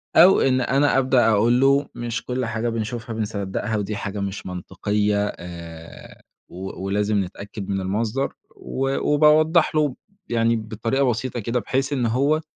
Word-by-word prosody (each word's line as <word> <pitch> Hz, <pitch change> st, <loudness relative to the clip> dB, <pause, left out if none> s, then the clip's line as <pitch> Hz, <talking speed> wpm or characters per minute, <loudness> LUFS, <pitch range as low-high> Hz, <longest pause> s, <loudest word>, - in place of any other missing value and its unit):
أو 180 Hz, +4 st, +7 dB
إن 130 Hz, -1 st, +3 dB
أنا 135 Hz, +3 st, +2 dB
أبدأ 130 Hz, -3 st, +3 dB
أقول 115 Hz, +4 st, +3 dB
له: 140 Hz, +1 st, +4 dB
"مش 120 Hz, -1 st, -4 dB
كل 125 Hz, 0 st, -2 dB
حاجة 115 Hz, +1 st, -2 dB
بنشوفها 115 Hz, +1 st, -4 dB
بنصدقها، 105 Hz, 0 st, -2 dB
ودي 105 Hz, +1 st, -3 dB
حاجة 100 Hz, 0 st, -4 dB
مش 100 Hz, 0 st, -4 dB
منطقية، 105 Hz, +3 st, -1 dB
آآ 85 Hz, -2 st, -10 dB, 0.3 s
و 95 Hz, +1 st, -7 dB
ولازم 100 Hz, 0 st, +1 dB
نتأكد 100 Hz, +2 st, -8 dB
من 95 Hz, -1 st, -1 dB
المصدر." 110 Hz, +8 st, -1 dB, 0.2 s
و 135 Hz, +1 st, -2 dB
وباوضح 155 Hz, +2 st, +4 dB
له، 150 Hz, -4 st, +2 dB, 0.3 s
يعني 115 Hz, 0 st, +2 dB
بطريقة 115 Hz, +5 st, -1 dB
بسيطة 120 Hz, +1 st, -2 dB
كده، 120 Hz, +3 st, -1 dB
بحيث 135 Hz, +4 st, -1 dB
إن 125 Hz, -3 st, 0 dB
هو 140 Hz, +7 st, +2 dB
115 Hz, 150 wpm, -23 LUFS, 100-135 Hz, 0.3 s, أو